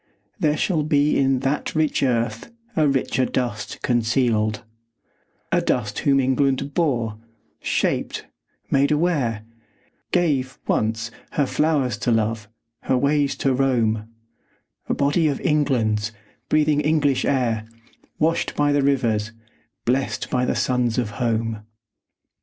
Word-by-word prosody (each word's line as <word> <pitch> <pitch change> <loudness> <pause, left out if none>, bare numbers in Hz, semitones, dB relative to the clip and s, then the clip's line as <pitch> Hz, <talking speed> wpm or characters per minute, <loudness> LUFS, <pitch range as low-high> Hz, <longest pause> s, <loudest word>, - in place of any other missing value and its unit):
There 150 0 +2
shall 170 -5 +1
be 150 -1 +2
In 135 -1 +2
that 140 +4 -1
rich 155 -1 +1
earth 115 - -1 0.2
a 155 -2 +3
richer 135 -1 +1
dust 120 -4 -3
concealed; 115 -3 +1 0.9
A - - +3
dust 105 -4 -1
whom 140 -1 +3
England 135 +1 +1
bore, 120 -10 0 0.4
shaped, - - -1 0.5
made 140 +1 +3
aware, 150 -9 +1 0.7
Gave, 140 -7 +1
once, 110 +1 0 0.2
her 145 - +2
flowers 140 -6 +1
to - - -1
love, 110 -1 0 0.4
her 130 - +2
ways 140 +1 +1
to 135 - +1
roam, 115 -5 +1 0.8
A - - +1
body 145 +3 +2
of 140 -3 -1
England's, 115 - +1 0.4
breathing 150 -1 +3
English 150 -3 +2
air, 115 -5 0 0.5
Washed 165 +2 0
by 145 0 +2
the 145 0 +3
rivers, 115 -6 +1 0.5
blest 130 +3 -1
by 125 0 +1
suns 125 -2 0
of 120 -4 -1
home. 115 -2 -1
130 Hz, 120 wpm, -22 LUFS, 115-145 Hz, 0.9 s, a